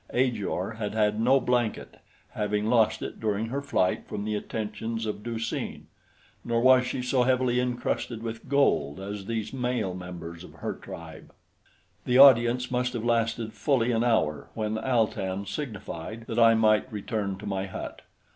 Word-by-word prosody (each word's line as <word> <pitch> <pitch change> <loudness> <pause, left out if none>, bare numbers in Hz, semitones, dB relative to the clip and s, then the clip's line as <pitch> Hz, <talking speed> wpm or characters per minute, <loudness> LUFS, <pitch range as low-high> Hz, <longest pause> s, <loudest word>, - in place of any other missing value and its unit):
Ajor 115 -6 0
had 105 -1 -3
had 105 -1 +2
no 130 +4 +5
blanket, 120 -3 -1 0.3
having 105 0 -1
lost 110 -1 +3
it - - -6
during 110 0 -1
her 140 +3 -2
flight 95 -10 0
from 100 - -4
the 110 - -1
attentions 110 +2 -3
of 105 -1 -4
Du 115 +1 -4
seen; 115 - -4 0.6
nor 115 -1 0
was 130 +1 +5
she 125 0 -3
so 125 0 +2
heavily 125 -1 +2
incrusted 120 -2 -2
with 115 +2 -6
gold 140 - +2
as 100 0 -6
these 115 0 -3
male 125 -7 -1
members 85 -2 -8
of - - -12
her - - -4
tribe. 80 -1 -10 0.7
The 125 - +3
audience 125 -2 +6
must 125 0 0
have 120 -2 -3
lasted 115 -1 0
fully 125 -5 +1
an 115 0 +1
hour 95 -12 +1
when 110 0 -2
Al 120 -3 +3
tan 95 -1 -4
signified 110 - -6
that 115 0 -2
I 115 -1 +7
might 110 +2 +3
return 105 -2 -3
to 105 - -10
my 95 -1 -2
hut. 95 - -7
115 Hz, 165 wpm, -27 LUFS, 105-125 Hz, 0.7 s, I